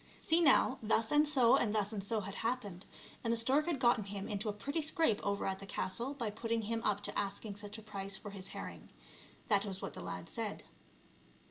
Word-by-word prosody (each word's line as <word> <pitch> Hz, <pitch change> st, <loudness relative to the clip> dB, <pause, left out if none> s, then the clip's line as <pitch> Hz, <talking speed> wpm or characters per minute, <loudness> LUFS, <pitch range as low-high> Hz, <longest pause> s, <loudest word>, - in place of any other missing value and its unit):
See 325 Hz, +2 st, +3 dB
now, 270 Hz, -4 st, +5 dB
thus 220 Hz, 0 st, +2 dB
and 295 Hz, +1 st, +5 dB
so 260 Hz, -6 st, +5 dB
and 220 Hz, -3 st, +1 dB
thus 210 Hz, 0 st, +1 dB
and 200 Hz, -2 st, -3 dB
so 215 Hz, +1 st, 0 dB
had 195 Hz, 0 st, -6 dB
happened, 215 Hz, -6 st, -3 dB, 0.4 s
and 230 Hz, -, +1 dB
the 230 Hz, -, +2 dB
stork 270 Hz, +7 st, +3 dB
had 335 Hz, -4 st, +1 dB
gotten 240 Hz, -4 st, +3 dB
him 200 Hz, 0 st, -5 dB
into 210 Hz, +1 st, -2 dB
a -, -, +1 dB
pretty 280 Hz, +10 st, -3 dB
scrape 310 Hz, -, +2 dB
over 200 Hz, 0 st, 0 dB
at 190 Hz, 0 st, -1 dB
the 195 Hz, -, -9 dB
castle 235 Hz, +8 st, -2 dB
by 235 Hz, -6 st, -2 dB
putting 225 Hz, +1 st, -1 dB
him 225 Hz, +2 st, -1 dB
up 205 Hz, -1 st, +1 dB
to -, -, -3 dB
asking 200 Hz, +1 st, -2 dB
such 205 Hz, +1 st, -7 dB
a 220 Hz, -, -10 dB
price 195 Hz, -2 st, -4 dB
for 205 Hz, -, -8 dB
his 195 Hz, -1 st, -7 dB
herring; -, -, -7 dB, 0.6 s
that 200 Hz, -2 st, +3 dB
was 195 Hz, -2 st, -4 dB
what -, -, -5 dB
the -, -, -8 dB
lad -, -, -5 dB
said. -, -, -4 dB
215 Hz, 225 wpm, -35 LUFS, 200-245 Hz, 0.6 s, now